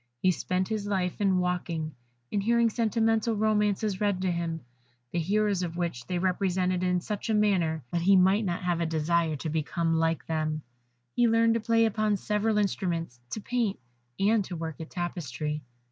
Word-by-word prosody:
He 185 Hz, -, +4 dB
spent 185 Hz, +1 st, -1 dB
his 215 Hz, -2 st, -3 dB
life 190 Hz, -2 st, -1 dB
in 195 Hz, -2 st, +3 dB
walking; 170 Hz, -3 st, -1 dB, 0.4 s
in 205 Hz, -, 0 dB
hearing 235 Hz, +2 st, +3 dB
sentimental 225 Hz, 0 st, +1 dB
romances 210 Hz, -1 st, +1 dB
read 205 Hz, -3 st, +1 dB
to 185 Hz, -, +1 dB
him, 170 Hz, -1 st, -2 dB, 0.5 s
the 175 Hz, -, -1 dB
heroes 200 Hz, +2 st, +1 dB
of 170 Hz, -1 st, -4 dB
which 170 Hz, -9 st, -3 dB
they 180 Hz, -, -1 dB
represented 185 Hz, 0 st, 0 dB
in 180 Hz, -1 st, +1 dB
such 210 Hz, +4 st, -4 dB
a 220 Hz, -, +3 dB
manner 175 Hz, -8 st, +2 dB
that 170 Hz, -, 0 dB
he 195 Hz, +3 st, +5 dB
might 190 Hz, +3 st, +4 dB
not 180 Hz, -2 st, -2 dB
have 175 Hz, -1 st, 0 dB
a 165 Hz, -, +1 dB
desire 160 Hz, 0 st, +1 dB
to 150 Hz, +3 st, -4 dB
become 165 Hz, +1 st, 0 dB
like 165 Hz, -1 st, +1 dB
them; 155 Hz, -1 st, -2 dB, 0.5 s
he 240 Hz, -1 st, +4 dB
learned 230 Hz, 0 st, +4 dB
to 230 Hz, -, +1 dB
play 230 Hz, +1 st, +3 dB
upon 215 Hz, -1 st, +1 dB
several 210 Hz, +2 st, 0 dB
instruments, 175 Hz, -, -1 dB
to 215 Hz, -, -4 dB
paint, 235 Hz, -3 st, -1 dB, 0.4 s
and 210 Hz, +2 st, +3 dB
to 180 Hz, -, -6 dB
work 160 Hz, -1 st, -5 dB
at 160 Hz, -, -7 dB
tapestry. 150 Hz, -4 st, -3 dB
185 Hz, 180 wpm, -28 LUFS, 170-210 Hz, 0.5 s, he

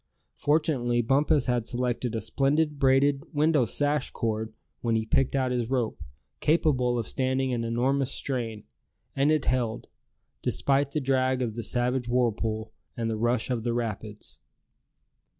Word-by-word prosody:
Fortunately 130 Hz, -6 st, +1 dB
Bumpus 140 Hz, +3 st, +2 dB
had 120 Hz, -2 st, 0 dB
selected 125 Hz, -1 st, -2 dB
a 110 Hz, -, -1 dB
splendid 145 Hz, +6 st, +1 dB
braided 135 Hz, +1 st, +3 dB
window 150 Hz, -3 st, +3 dB
sash 145 Hz, +3 st, 0 dB
cord 110 Hz, -1 st, -2 dB, 0.3 s
when 115 Hz, -1 st, 0 dB
he 110 Hz, 0 st, 0 dB
picked 135 Hz, +3 st, +1 dB
out 130 Hz, -2 st, +1 dB
his 120 Hz, -2 st, -1 dB
rope, 125 Hz, -4 st, -1 dB, 0.4 s
capable 130 Hz, -6 st, +2 dB
of 115 Hz, -, -2 dB
standing 130 Hz, 0 st, 0 dB
an 115 Hz, -1 st, -1 dB
enormous 130 Hz, +4 st, +1 dB
strain; 115 Hz, -6 st, -3 dB, 0.5 s
and 140 Hz, +2 st, +3 dB
it 155 Hz, -2 st, +1 dB
held, 120 Hz, -3 st, 0 dB, 0.6 s
despite 140 Hz, 0 st, +1 dB
the 150 Hz, +2 st, -2 dB
drag 130 Hz, -1 st, +1 dB
of 115 Hz, -3 st, -2 dB
the 115 Hz, -, -4 dB
savage 125 Hz, +2 st, -1 dB
whirlpool, 110 Hz, -2 st, 0 dB, 0.2 s
and 115 Hz, -1 st, -1 dB
the -, -, -1 dB
rush 120 Hz, +2 st, 0 dB
of 115 Hz, -3 st, -1 dB
the 120 Hz, 0 st, 0 dB
rapids. 110 Hz, -2 st, -5 dB
125 Hz, 150 wpm, -27 LUFS, 115-135 Hz, 0.6 s, braided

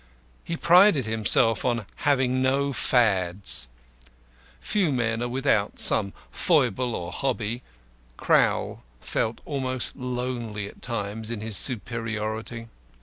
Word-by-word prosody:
He 170 Hz, -, -4 dB
prided 175 Hz, -, +5 dB
himself 110 Hz, 0 st, +2 dB
on 120 Hz, -4 st, -1 dB
having 130 Hz, -3 st, +1 dB
no 140 Hz, +2 st, +1 dB
fads. 100 Hz, -, +3 dB, 0.9 s
Few 190 Hz, -7 st, 0 dB
men 115 Hz, -3 st, -1 dB
are 120 Hz, -, -1 dB
without 120 Hz, -5 st, 0 dB
some 100 Hz, -3 st, +4 dB, 0.2 s
foible 125 Hz, +3 st, +1 dB
or 85 Hz, 0 st, -5 dB
hobby; 120 Hz, 0 st, -3 dB, 0.6 s
Crowl -, -, +1 dB, 0.2 s
felt 115 Hz, -, -3 dB
almost 130 Hz, -3 st, -3 dB
lonely 125 Hz, -5 st, -4 dB
at -, -, -14 dB
times 110 Hz, -2 st, -4 dB
in 115 Hz, -3 st, -4 dB
his 110 Hz, -1 st, -2 dB
superiority. 115 Hz, -1 st, -1 dB
115 Hz, 110 wpm, -25 LUFS, 110-130 Hz, 0.9 s, prided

